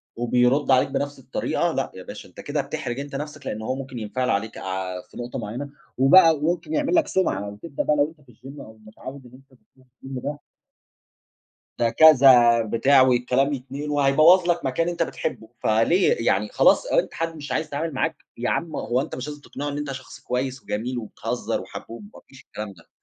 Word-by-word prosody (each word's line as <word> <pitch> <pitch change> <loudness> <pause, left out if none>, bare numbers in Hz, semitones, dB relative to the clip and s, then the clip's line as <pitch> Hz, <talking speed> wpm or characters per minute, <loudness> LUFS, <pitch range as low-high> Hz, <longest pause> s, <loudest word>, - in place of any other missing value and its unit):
وبيرد 125 +4 +2
عليك 130 +2 +4
بنفس 145 -1 -3
الطريقة، 130 0 -1
لأ - - -2
يا - - -9
باشا، - - -10
أنت - - -12
كده 145 0 -2
بتحرج 140 -3 -5
أنت 140 -1 -6
نفسك 150 0 -6
لإن 110 - -4
هو 130 +4 -2
ممكن 130 -3 -7
ينفعل 125 +4 -2
عليك 110 +3 -1
ع 95 -1 -4
في - - -17
نقطة 120 0 -5
معيّنة، 120 +7 -5 0.3
وبقى 165 +5 +7
وممكن 170 - -2
يعمل 300 +3 +1
لك 325 - +3
سُمعَة. 105 - 0
وتبدأ 140 +9 -5
بقى 150 - +2
لو 145 +1 +2
أنت 140 - -24
في 120 - -18
الgym 135 +5 -12
أو 110 0 -13
متعوّد 130 +5 -10
إن 120 - -15
أنت 130 -1 -19
بتروح 130 -1 -28 0.2
الgym 130 -2 -6
ده 145 0 -4 1.4
ده 115 -1 +3
كذا، 125 -6 +7
بتاع 130 +5 +4
والكلام 130 +2 +2
يتنقل 140 +3 -6
وهيبوظ 155 +6 +5
لك 170 -4 +1
مكان 165 +6 0
أنت 170 -1 0
بتحبه، 110 -7 -5
فليه، 140 - +3
يعني - - +1
خلاص - - +4
أنت - - 0
حد 165 0 -3
مش 145 -3 -8
عايز 155 +4 -1
يتعامل 155 +1 -3
معاك، 130 - -1 0.2
يا 120 - -1
عم 165 -2 -2
هو 125 +2 0
أنت - - -6
مش 130 +3 -6
لازم 145 -1 -8
تقنعه 145 +1 -6
إن 145 - -4
أنت 145 -2 -4
شخص 130 -1 -9
كويّس 130 +1 -3
وجميل 120 +4 -3
وبتهزّر 115 +1 -3
وحبوب، 115 - -9
ما - - -14
فيش 130 -1 -16
الكلام 105 -2 -7
ده. 85 - -21
135 Hz, 200 wpm, -24 LUFS, 120-150 Hz, 1.4 s, وبقى